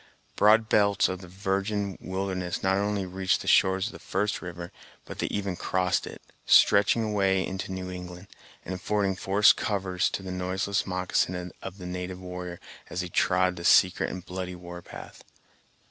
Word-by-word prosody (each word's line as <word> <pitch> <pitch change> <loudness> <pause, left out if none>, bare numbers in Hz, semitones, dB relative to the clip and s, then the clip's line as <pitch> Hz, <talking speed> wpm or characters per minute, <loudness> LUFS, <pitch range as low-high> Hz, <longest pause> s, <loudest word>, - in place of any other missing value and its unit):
Broad 110 +2 +5
belts 100 -3 +3
of 95 0 -5
the 90 - -10
virgin 100 +1 -2
wilderness 95 -1 -3
not 95 0 +2
only 100 -1 -1
reached 95 +1 0
the - - -9
shores 95 0 +4
of 115 - -4
the - - -10
first 105 +3 -2
river, 85 -1 -7 0.3
but - - -9
they - - 0
even 100 -3 -2
crossed 90 +1 0
it, - - -10 0.2
stretching 105 +3 +5
away 95 -3 +1
into 95 0 -5
New 95 0 -5
England, 90 0 -8 0.4
and 95 - -4
affording 100 +1 0
forest 100 +3 +4
covers 95 -3 0
to 95 - -5
the 95 - -6
noiseless 95 +2 -1
moccasin 90 -1 -1
of 95 0 -7
the 90 - -9
native 90 0 -5
warrior, 90 -1 -7 0.3
as 90 - -3
he 90 - -5
trod 90 +1 +2
the 85 - -7
secret 90 +1 +4
and 90 -1 -7
bloody 90 0 -5
war 90 0 -9
path. - - -11
95 Hz, 175 wpm, -27 LUFS, 90-100 Hz, 0.4 s, Broad